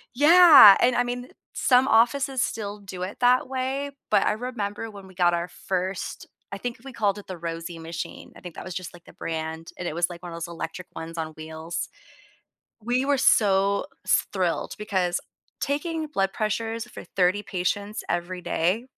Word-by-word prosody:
Yeah, 305 - +9
and, 250 0 +4
I 245 - +3
mean, 245 +1 -5 0.2
some 255 0 +4
offices 265 +3 +3
still 210 -1 -3
do 190 -2 -7
it 190 - -6
that 250 +1 +4
way, 270 +2 -2 0.2
but - - +4
I - - +3
remember 220 -2 -4
when 200 -2 -11
we 185 - -15
got 175 -1 +3
our 170 0 -2
first 185 +1 -4 0.3
I - - -3
think 235 +3 -5
we 270 - -9
called 205 -4 0
it 205 - -11
the 185 - -6
Rosie 165 0 -6
machine- 165 +2 -7
I - - -14
think 175 -2 -9
that - - -8
was 185 - -6
just, 185 -2 -6
like, 175 -1 -15
the - - -15
brand, 160 +1 -5
and 175 - -4
it 155 - -4
was, 170 0 +1
like, 170 -1 -9
one 175 - -7
of - - -6
those 170 +1 -5
electric 170 +1 -6
ones 165 +1 -7
on 160 - -2
wheels. 160 +2 -5 1.0
We 245 +3 +1
were 280 0 +2
so 200 -5 +3 0.2
s - - +2
thrilled 180 -4 -1
because 185 -4 0 0.4
taking 310 +2 -2
blood 195 -9 0
pressures 225 +1 -2
for - - -10
30 185 +2 +1
patients 200 +2 -2
every 175 +1 -2
day 185 +11 0
195 Hz, 190 wpm, -25 LUFS, 175-245 Hz, 1.0 s, Yeah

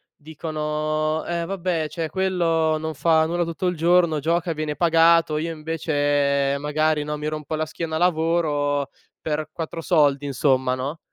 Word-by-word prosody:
dicono: 155 0 -2
“Eh 170 -1 -2
vabbè, 175 -4 -2
cioè 165 0 -3
quello 165 -3 +1
non 160 0 -4
fa 160 +2 +3
nulla 175 +2 0
tutto 170 +2 -3
il 180 - 0
giorno, 170 -1 +3
gioca, 165 +3 0
viene 150 -1 -4
pagato, 165 -1 +4
io 165 +2 -2
invece 145 -3 0
magari, 150 +1 0
no, 150 0 -4
mi 150 0 -4
rompo 155 0 -4
la 155 0 -1
schiena 160 0 -5
a - - -3
lavoro 155 -4 +1 0.3
per 155 0 -3
4 165 0 -5
soldi”, 145 -5 +2
insomma, 130 -1 +1
no. 140 +5 -4
155 Hz, 155 wpm, -23 LUFS, 150-165 Hz, 0.3 s, pagato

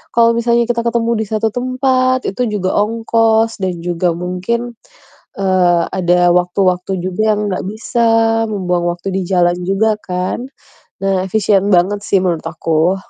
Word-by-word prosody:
kalau 230 0 +5
misalnya 235 0 +1
kita 235 -1 0
ketemu 235 0 0
di 220 - -1
satu 220 +1 -1
tempat 255 +1 0
itu 245 +5 -2
juga 185 -2 -1
ongkos, 225 +1 +1
dan 180 -3 -3
juga 175 -1 -1
mungkin, 185 +7 -3 0.7
eee, 185 -3 +2
ada 175 -1 +2
waktu-waktu 180 +1 0
juga 185 +3 -3
yang 210 - -2
nggak 185 - -3
bisa, 220 +3 -4 0.5
membuang 180 -4 -1
waktu 180 +2 -5
di 190 - -1
jalan 175 -1 +2
juga 195 +4 +1
kan. 180 +5 -3 0.6
Nah, 195 -1 +1
efisien 205 -1 +2
banget 190 +2 +2
sih 190 -2 +2
menurut 170 -3 -1
aku. 165 +2 0
195 Hz, 145 wpm, -16 LUFS, 180-225 Hz, 0.7 s, kalau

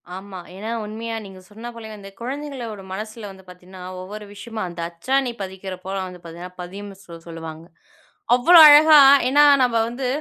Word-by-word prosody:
ஆமா, 190 0 -9 0.2
ஏன்னா 210 +4 -7 0.2
உண்மையா 225 +2 -6
நீங்க 190 -1 -12
சொன்ன 220 +3 -10
போலயே 225 -2 -10
வந்து 200 -1 -12
குழந்தைகளோட 255 -5 -6
மனசுல 215 +2 -7
வந்து 190 0 -16
பாத்தீங்கன்னா 180 +1 -13 0.2
ஒவ்வொரு 210 +3 -9
விஷயமு 220 +2 -9
அந்த 175 -1 -10
அச்சானி 255 +10 -1
பதிக்கற 190 0 -7
போல 190 +1 -5
வந்து 180 -1 -11
பாத்தீங்கன்னா 175 +2 -10
பதியும்னு 195 +3 -9
சொ - - -17 0.2
சொல்லுவாங்க. 165 -1 -9 0.7
அவ்ளோ 335 +8 +5
அழகா 300 +1 +8 0.3
ஏன்னா 290 +2 +5 0.2
நம்ம 245 -2 0
வந்து 250 +2 -5
205 Hz, 160 wpm, -21 LUFS, 185-235 Hz, 0.7 s, அழகா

